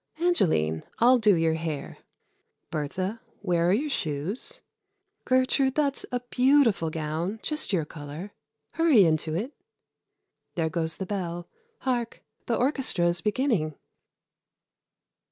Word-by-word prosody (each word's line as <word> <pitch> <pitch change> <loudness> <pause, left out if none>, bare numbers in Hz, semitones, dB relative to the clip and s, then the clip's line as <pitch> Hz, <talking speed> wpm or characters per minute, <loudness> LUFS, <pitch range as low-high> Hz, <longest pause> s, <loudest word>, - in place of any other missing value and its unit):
Angeline, 155 - +2
I'll 245 +2 +5
do 210 -4 +5
your 165 -1 +2
hair. 160 -3 -4 0.7
Bertha, 185 +8 -3 0.2
where 175 -3 +2
are - - +4
your 275 +9 +1
shoes? 160 - -2 0.6
Gertrude, 260 +1 +2
that's 285 -2 0
a 245 -1 -1
beautiful 250 - +3
gown 160 +6 -3
just 305 -6 -1
your 170 -6 +1
color. 150 +6 -8 0.4
Hurry 310 - +5
into 155 -1 +1
it. 235 - -3 1.0
There 160 -2 0
goes 160 0 -2
the 190 - -4
bell. 175 -3 -4 0.3
Hark! 245 -3 -2 0.2
the 235 - +1
orchestra 260 - +2
is 175 0 -1
beginning." 210 - 0
190 Hz, 120 wpm, -27 LUFS, 160-250 Hz, 1.0 s, I'll